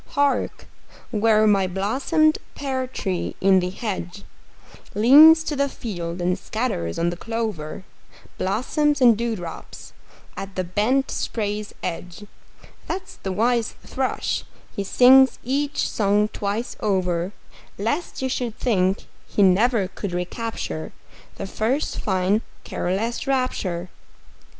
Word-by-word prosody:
Hark, 285 Hz, -1 st, +1 dB, 0.5 s
where 215 Hz, -1 st, +3 dB
my 200 Hz, -3 st, +3 dB
blossomed 265 Hz, -, +1 dB, 0.2 s
pear 265 Hz, -2 st, -2 dB
tree 190 Hz, -7 st, -3 dB
in 190 Hz, 0 st, +5 dB
the 180 Hz, 0 st, -1 dB
hedge 195 Hz, -2 st, -5 dB, 0.7 s
Leans 300 Hz, +9 st, +8 dB
to 305 Hz, -, -3 dB
the 280 Hz, 0 st, +1 dB
field 175 Hz, -8 st, -5 dB
and 180 Hz, +2 st, 0 dB
scatters 215 Hz, -, -2 dB
on 170 Hz, +1 st, +1 dB
the -, -, -5 dB
clover 210 Hz, -6 st, -4 dB, 0.6 s
Blossoms 290 Hz, -, +1 dB
and 240 Hz, -3 st, +6 dB
dewdrops 215 Hz, -7 st, -5 dB, 0.4 s
at 195 Hz, 0 st, -7 dB
the 185 Hz, -, -1 dB
bent 215 Hz, +10 st, +1 dB
spray's 210 Hz, -1 st, -3 dB
edge 180 Hz, +3 st, -5 dB, 0.6 s
That's 380 Hz, -, -5 dB
the 190 Hz, -, -4 dB
wise 230 Hz, +4 st, +1 dB
thrush; 260 Hz, -1 st, -2 dB, 0.3 s
he 200 Hz, -, -2 dB
sings 260 Hz, +6 st, +6 dB
each 280 Hz, +3 st, 0 dB
song 210 Hz, 0 st, +2 dB
twice 210 Hz, +4 st, -3 dB
over, 180 Hz, -3 st, 0 dB, 0.5 s
Lest 265 Hz, -, -2 dB
you -, -, +1 dB
should 245 Hz, -3 st, -3 dB
think 195 Hz, -5 st, +1 dB, 0.2 s
he 205 Hz, -, +2 dB
never 200 Hz, +2 st, +4 dB
could 190 Hz, 0 st, -6 dB
recapture 180 Hz, -, -4 dB, 0.4 s
The -, -, -5 dB
first 230 Hz, +9 st, -1 dB
fine 190 Hz, +2 st, +1 dB, 0.2 s
careless 220 Hz, +9 st, -2 dB
rapture! 195 Hz, -10 st, -1 dB
210 Hz, 120 wpm, -23 LUFS, 185-255 Hz, 0.7 s, Leans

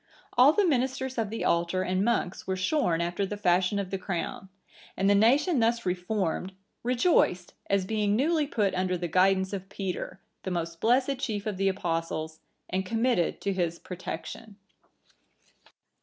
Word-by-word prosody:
(987) -, -, -3 dB
All 285 Hz, +4 st, +7 dB
the 400 Hz, +2 st, +3 dB
ministers 260 Hz, -2 st, 0 dB
of 220 Hz, -3 st, -1 dB
the 225 Hz, -, -3 dB
altar 170 Hz, +2 st, +1 dB
and 185 Hz, +1 st, 0 dB
monks 210 Hz, -5 st, -1 dB
were 190 Hz, -, 0 dB
shorn 185 Hz, -, +1 dB
after 175 Hz, +3 st, -1 dB
the 205 Hz, +1 st, -3 dB
fashion 185 Hz, 0 st, +2 dB
of 195 Hz, -2 st, -3 dB
the 195 Hz, -, -2 dB
crown; 190 Hz, +1 st, -4 dB, 0.5 s
and 195 Hz, -, +2 dB
the 200 Hz, -, +5 dB
nation 265 Hz, -, +4 dB
thus 235 Hz, +1 st, +1 dB
reformed, 185 Hz, 0 st, -1 dB, 0.3 s
rejoiced, 240 Hz, -, +2 dB, 0.2 s
as 195 Hz, -1 st, +2 dB
being 210 Hz, 0 st, +1 dB
newly 305 Hz, +4 st, +2 dB
put 210 Hz, -8 st, 0 dB
under 185 Hz, 0 st, 0 dB
the 175 Hz, 0 st, -3 dB
guidance 190 Hz, +3 st, +2 dB
of 195 Hz, -1 st, -5 dB
Peter, 190 Hz, -1 st, -4 dB, 0.2 s
the -, -, -4 dB
most 170 Hz, -2 st, -3 dB
blessed 255 Hz, +3 st, +2 dB
chief 210 Hz, -6 st, -3 dB
of 210 Hz, -3 st, -3 dB
the 195 Hz, 0 st, +2 dB
Apostles, 165 Hz, -4 st, -3 dB, 0.3 s
and 190 Hz, +1 st, -1 dB
committed 225 Hz, -3 st, 0 dB
to 200 Hz, -, -1 dB
his 170 Hz, -2 st, -1 dB
protection. 190 Hz, +4 st, -7 dB
195 Hz, 165 wpm, -28 LUFS, 180-230 Hz, 0.5 s, All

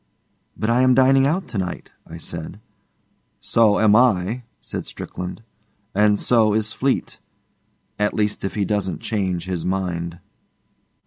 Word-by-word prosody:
'But 110 Hz, +2 st, 0 dB
I 120 Hz, +2 st, +3 dB
am 130 Hz, -1 st, +5 dB
dining 135 Hz, +1 st, +5 dB
out 175 Hz, +6 st, -1 dB
to 110 Hz, -, -3 dB
night,' 90 Hz, -2 st, -5 dB, 0.2 s
I 80 Hz, -, -9 dB
said. 85 Hz, +3 st, -6 dB, 0.8 s
'So 110 Hz, -3 st, +3 dB
am 105 Hz, -1 st, +5 dB
I,' 115 Hz, -1 st, +3 dB, 0.2 s
said -, -, -6 dB
Strickland, 90 Hz, +5 st, -7 dB, 0.5 s
'and 105 Hz, +1 st, +4 dB
so 110 Hz, -3 st, +3 dB
is 110 Hz, 0 st, -1 dB
Fleete. 135 Hz, 0 st, -1 dB, 0.8 s
At 105 Hz, 0 st, +1 dB
least 105 Hz, -1 st, -1 dB
if 95 Hz, -, -3 dB
he 105 Hz, -2 st, 0 dB
doesn't 100 Hz, -2 st, -2 dB
change 95 Hz, -6 st, -2 dB
his 90 Hz, -3 st, -3 dB
mind. 85 Hz, -2 st, -2 dB
105 Hz, 140 wpm, -22 LUFS, 90-115 Hz, 0.8 s, am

